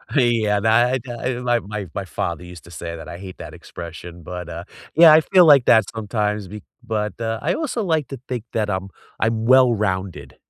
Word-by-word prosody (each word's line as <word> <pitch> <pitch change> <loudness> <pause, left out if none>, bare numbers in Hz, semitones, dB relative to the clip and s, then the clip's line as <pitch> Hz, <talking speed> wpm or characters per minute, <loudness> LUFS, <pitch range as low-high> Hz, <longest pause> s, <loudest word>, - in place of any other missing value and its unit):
Yeah, 115 -5 +2
that 120 +4 +2
i - - -5 0.3
i - - -5
my 120 -1 +1
my 105 -2 -6
my 100 - -3
father 90 - -4
used 90 -1 -12
to 85 - -14
say 85 0 -6
that, 80 - -10
I 85 - -7
hate 95 -1 -10
that - - -9
expression, 85 0 -10
but, 90 0 -7
uh, 85 +1 -6 0.3
yeah, 165 -1 +8
I 160 - +7
feel 180 +1 +5
like 140 -5 +6
that 110 -3 +5
sometimes 105 -2 -2
be 105 +1 -9 0.2
but, 105 -1 -3
uh, 115 0 -2
I 165 +4 0
also 295 -7 -2
like 160 -5 0
to 135 -3 -7
think 125 -4 -4
that 105 -2 -1
I'm 95 0 -3 0.3
I'm 110 0 0
well-rounded. 100 - +2
105 Hz, 205 wpm, -21 LUFS, 95-125 Hz, 0.3 s, yeah